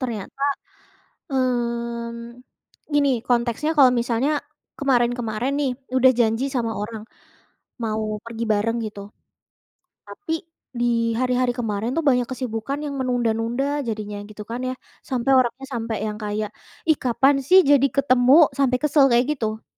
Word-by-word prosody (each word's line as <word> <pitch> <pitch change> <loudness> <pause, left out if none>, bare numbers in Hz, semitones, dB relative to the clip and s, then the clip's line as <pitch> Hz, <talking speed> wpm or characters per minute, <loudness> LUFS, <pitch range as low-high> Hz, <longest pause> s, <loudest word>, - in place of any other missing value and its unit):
Ternyata, 240 +1 -5 0.9
mmm, 235 -1 -2 0.5
gini 285 -1 +3 0.2
konteksnya, 240 +5 +1
kalau 260 -3 +7
misalnya 245 +5 0 0.5
kemarin-kemarin 245 -2 0
nih 280 - +1 0.3
udah 260 0 +6
janji 225 +3 +2
sama 230 -2 0
orang 215 0 -5 0.8
mau 220 -1 -1 0.2
pergi 230 0 -5
bareng 225 +3 0
gitu, 205 -1 -7 1.1
tapi 365 -6 -7 0.5
di 230 -1 +1
hari-hari 250 -1 +1
kemarin 225 0 -2
tuh 330 - 0
banyak 250 -2 +3
kesibukan 255 +1 -3
yang 285 - -4
menunda-nunda 240 0 0 0.2
jadinya 210 -1 -4
gitu 210 0 -9
kan, 240 +2 -3
ya, 255 - -2 0.4
sampai 255 +1 +1
orangnya 255 +2 0
sampai 225 -1 -3
yang 210 0 -4
kayak, 210 0 -2 0.4
“Ih, 315 - +4
kapan 265 +3 +3
sih 375 +1 +8
jadi 275 -1 +6
ketemu?” 255 -2 +4 0.3
Sampai 255 -2 +3
kesel 295 -1 +4
kayak 240 +2 +4
gitu. 220 -4 -4
240 Hz, 130 wpm, -23 LUFS, 225-260 Hz, 1.1 s, sih